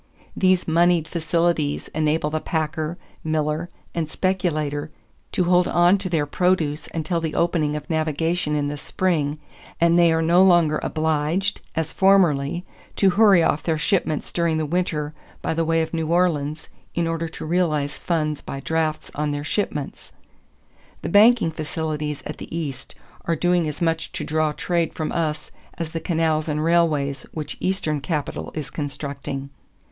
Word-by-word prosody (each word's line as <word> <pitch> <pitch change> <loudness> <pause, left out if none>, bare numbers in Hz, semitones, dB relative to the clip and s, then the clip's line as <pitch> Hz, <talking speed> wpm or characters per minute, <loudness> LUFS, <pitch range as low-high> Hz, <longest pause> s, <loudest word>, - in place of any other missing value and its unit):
These 185 -1 +2
moneyed 170 0 +3
facilities 165 -2 0
enable 155 0 0
the 155 - 0
packer, 160 +1 -2 0.3
miller, 155 +1 -1 0.2
and 165 -2 -2
speculator 155 -6 -1 0.4
to 185 - +1
hold 180 +1 +3
on 175 +3 +4
to 185 - -3
their 160 -4 +1
produce 160 -2 0
until 165 +1 -1
the 160 -1 -3
opening 160 -3 +1
of 150 - -5
navigation 160 0 0
in 145 -1 0
the 145 +1 -3
spring 155 -2 -1 0.4
and 170 +1 +4
they 170 -1 +6
are 160 0 +2
no 170 +3 +5
longer 175 -5 +5
obliged, 160 +4 0
as 160 -1 -2
formerly, 175 -4 +3 0.3
to 195 -2 +4
hurry 200 -3 +6
off 150 - +1
their 160 -2 0
shipments 155 -2 0
during 170 -2 +1
the 155 - 0
winter 155 -2 -1 0.3
by - - 0
the 165 +1 0
way 165 0 +2
of 160 - -6
New 160 -1 -1
Orleans 160 -3 +1 0.3
in 170 - +1
order 165 0 -1
to 160 - -8
realize 155 -4 0
funds 155 -4 -1
by 135 - -6
drafts 160 +1 -1
on 150 0 -1
their 145 0 -2
shipments. 150 -4 -3 0.9
The - - -2
banking 215 -1 +6
facilities 155 -1 -3
at - - -5
the - - -9
East 140 -6 -5 0.3
are 165 - +1
doing 175 0 +2
as 155 +4 -3
much 165 -1 0
to - - -3
draw 155 0 +1
trade 170 +2 -1
from 155 - -2
us 155 -2 -2 0.3
as 165 -2 -4
the 165 - -3
canals 160 -2 0
and 150 0 -1
railways 155 -4 +1
which 150 -2 -5
Eastern 160 -6 -1
capital 150 +1 -3
is 155 -2 -5
constructing." 140 -1 -5
160 Hz, 160 wpm, -23 LUFS, 150-175 Hz, 0.9 s, they